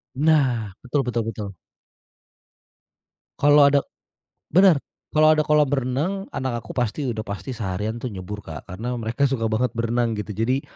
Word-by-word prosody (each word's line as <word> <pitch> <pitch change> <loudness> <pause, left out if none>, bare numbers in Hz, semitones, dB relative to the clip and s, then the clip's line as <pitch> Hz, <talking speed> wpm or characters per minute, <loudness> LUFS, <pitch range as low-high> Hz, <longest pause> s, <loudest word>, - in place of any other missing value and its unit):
Nah. 130 -9 +2
Betul 135 +3 0
betul 120 -1 0
betul. 105 -2 -6 1.9
Kalo 145 0 +6
ada 140 - +4 0.7
bener. 185 -3 +6 0.3
Kalo 155 0 +5
ada 155 - +2
kolam 150 0 +4
renang, 145 +10 -1
anak 130 -4 -3
aku - - -16
pasti 120 +4 -1
udah 110 -2 -4
pasti 100 +6 -6
seharian 110 -1 -3
tuh 120 -2 -5
nyebur 100 +2 -7
Kak 80 0 -9
karena 115 +7 -4
mereka 120 +3 0
suka 120 -5 0
banget 115 +2 0
berenang 115 0 0
gitu. 105 0 -5
Jadi 125 +5 +1
120 Hz, 150 wpm, -23 LUFS, 110-145 Hz, 1.9 s, Kalo